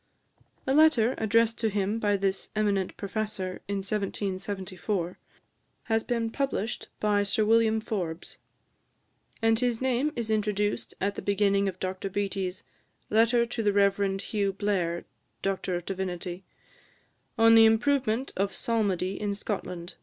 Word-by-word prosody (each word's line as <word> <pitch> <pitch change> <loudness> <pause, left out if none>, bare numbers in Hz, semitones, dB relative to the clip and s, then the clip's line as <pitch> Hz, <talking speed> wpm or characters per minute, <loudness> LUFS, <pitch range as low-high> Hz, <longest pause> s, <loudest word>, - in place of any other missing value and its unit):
A 265 - +1
letter, 275 -6 +5
addressed 225 +1 +2
to 225 - +1
him 205 +2 -1
by 205 -2 +2
this 195 0 -1
eminent 200 -3 0
professor, 200 -2 -3
in 200 -1 -2
1774, 195 -2 -3 0.6
has 225 -1 0
been 230 -2 -1
published 245 -4 -2
by 210 -1 +2
Sir 210 +2 +1
William 220 0 +4
Forbes; 180 -6 -4 1.0
and 225 0 +4
his 245 -2 +1
name 260 +3 +1
is 230 -3 -2
introduced 210 -1 -1
at 200 +1 0
the - - -6
beginning 200 -1 +2
of 185 -1 -9
Dr 185 +1 -3
Beattie's 195 -1 -2 0.5
"Letter 230 +2 +4
to 235 0 -4
the 205 -2 +2
Rev. 200 -1 +2
Hugh 200 -2 -1
Blair, 185 -4 -1 0.4
D.D., 185 -1 -3 0.9
on 225 0 +6
the 225 0 +8
Improvement 245 +2 +2
of 195 +1 -1
Psalmody 195 -5 0
in 205 -1 -1
Scotland. 180 -4 -5
205 Hz, 130 wpm, -28 LUFS, 195-225 Hz, 1.0 s, the